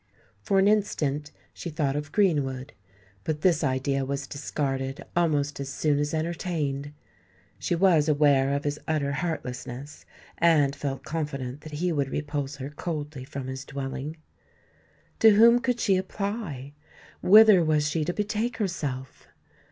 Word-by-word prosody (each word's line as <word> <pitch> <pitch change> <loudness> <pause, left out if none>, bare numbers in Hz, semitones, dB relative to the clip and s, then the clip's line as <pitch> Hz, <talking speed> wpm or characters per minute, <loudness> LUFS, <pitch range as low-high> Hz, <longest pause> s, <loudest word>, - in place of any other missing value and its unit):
For 195 - +1
an 195 +1 +5
instant 150 -9 +1 0.2
she 170 - -6
thought 145 -3 -1
of 145 0 -4
Greenwood; 145 -9 +1 0.5
but 150 -1 -2
this 175 -2 +3
idea 135 0 0
was 140 +1 -3
discarded 135 -1 -3
almost 150 -5 +1
as 140 -1 -4
soon 145 +1 +1
as 145 0 -1
entertained. 155 -4 -2 0.7
She 175 - 0
was 165 -4 +4
aware 145 -2 +4
of 140 +1 -1
his 145 0 -2
utter 150 -3 0
heartlessness, 140 -3 -5 0.4
and 150 -5 +4
felt 135 -2 -4
confident 140 -4 -4
that 155 -1 -10
he 175 +4 0
would 140 -4 0
repulse 145 -1 -3
her 140 +1 -7
coldly 150 -3 -5
from 135 0 -6
his 130 +1 -5
dwelling. 140 +2 -5 1.0
To 220 -2 +7
whom 235 +3 +7
could 250 -1 -1
she 195 -5 +3
apply? 190 - -4 0.5
whither 210 -2 +8
was 155 -2 +2
she 155 +1 0
to 175 - 0
betake 215 +4 -2
herself? 145 - -4
150 Hz, 145 wpm, -26 LUFS, 140-175 Hz, 1.0 s, whither